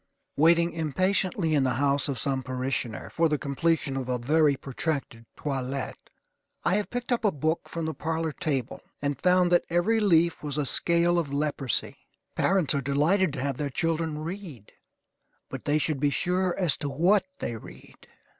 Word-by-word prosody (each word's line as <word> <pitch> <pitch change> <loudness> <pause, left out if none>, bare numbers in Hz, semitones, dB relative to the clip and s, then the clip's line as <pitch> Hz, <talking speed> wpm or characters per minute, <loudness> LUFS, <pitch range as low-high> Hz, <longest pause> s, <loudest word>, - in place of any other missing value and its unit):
Waiting 170 +3 +4
impatiently 170 +2 0
in 145 -3 +3
the 130 -2 +1
house 140 +1 +1
of 135 - -2
some 135 +1 -1
parishioner, 130 -3 -3
for 165 -1 +2
the 150 - +1
completion 140 +1 0
of 130 -1 -3
a 125 - +1
very 145 +4 +3
protracted 135 -4 -4
toilet, 135 -2 -4 0.6
I 175 - +3
have 210 - -2
picked 245 +1 -4
up 240 - +1
a 210 - +3
book 155 +2 -2
from 165 -1 -4
the 160 - -2
parlor 160 0 -2
table, 135 -5 -3 0.2
and 145 -2 -2
found 180 -1 +4
that 175 - +4
every 175 +7 +2
leaf 170 -5 +3
was 150 -1 -3
a 150 - 0
scale 170 +4 +2
of 150 -5 -3
leprosy. 140 -3 -1 0.4
Parents 185 -6 +2
are 140 - 0
delighted 150 +7 +2
to 140 - -4
have 135 -1 -2
their 145 -1 -2
children 165 +1 -1
read, 160 - -7 0.8
but - - -7
they 145 +1 +2
should 155 -2 0
be 145 +1 +2
sure 180 +4 0
as 180 -6 +2
to 145 - -3
what 180 - +3
they 120 - -3
read. 110 - -13
155 Hz, 175 wpm, -27 LUFS, 140-170 Hz, 0.8 s, Waiting